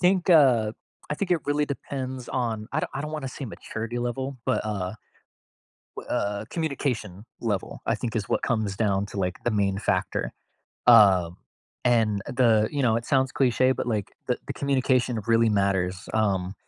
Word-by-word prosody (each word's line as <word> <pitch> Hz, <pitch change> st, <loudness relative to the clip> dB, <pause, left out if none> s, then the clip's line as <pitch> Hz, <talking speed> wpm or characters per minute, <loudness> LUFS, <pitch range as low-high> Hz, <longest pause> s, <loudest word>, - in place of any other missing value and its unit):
think, 180 Hz, 0 st, +3 dB
uh 125 Hz, -9 st, +5 dB, 0.4 s
I -, -, +1 dB
think 185 Hz, +2 st, -3 dB
it 175 Hz, -, +4 dB
really 145 Hz, +1 st, +2 dB
depends 130 Hz, -2 st, -5 dB
on 115 Hz, -4 st, -2 dB
I -, -, +1 dB
don't -, -, -3 dB
I 135 Hz, -, -2 dB
don't 150 Hz, +1 st, -5 dB
wanna 145 Hz, -4 st, -3 dB
say 135 Hz, +2 st, -7 dB
maturity 115 Hz, +1 st, -5 dB
level, 130 Hz, +3 st, -3 dB
but, -, -, +1 dB
uh, 100 Hz, -2 st, -3 dB, 1.0 s
w -, -, -8 dB
uh, 100 Hz, +1 st, -1 dB
communication 125 Hz, -, -3 dB, 0.2 s
level, 105 Hz, -5 st, -2 dB
I -, -, +2 dB
think, 115 Hz, -3 st, -4 dB
is 105 Hz, -3 st, -2 dB
what -, -, 0 dB
comes 110 Hz, -6 st, -1 dB
down 100 Hz, -2 st, +1 dB
to, 100 Hz, -, -7 dB
like, 90 Hz, -2 st, -2 dB
the 120 Hz, -, +2 dB
main 100 Hz, -2 st, +1 dB
factor. 95 Hz, -3 st, -1 dB, 0.6 s
Um, 95 Hz, -7 st, +6 dB, 0.5 s
and 110 Hz, -4 st, +3 dB
the 115 Hz, -4 st, +3 dB
you 145 Hz, -, -1 dB
know, 115 Hz, -4 st, +3 dB
it 115 Hz, -, -5 dB
sounds 130 Hz, 0 st, +2 dB
cliche, 130 Hz, 0 st, +3 dB
but, -, -, -4 dB
like, 105 Hz, -4 st, -2 dB, 0.2 s
the -, -, +1 dB
the -, -, -2 dB
communication 130 Hz, -4 st, +1 dB
really 115 Hz, 0 st, +4 dB
matters, 95 Hz, -3 st, 0 dB
um, 95 Hz, -4 st, +1 dB
115 Hz, 175 wpm, -26 LUFS, 100-130 Hz, 1.0 s, Um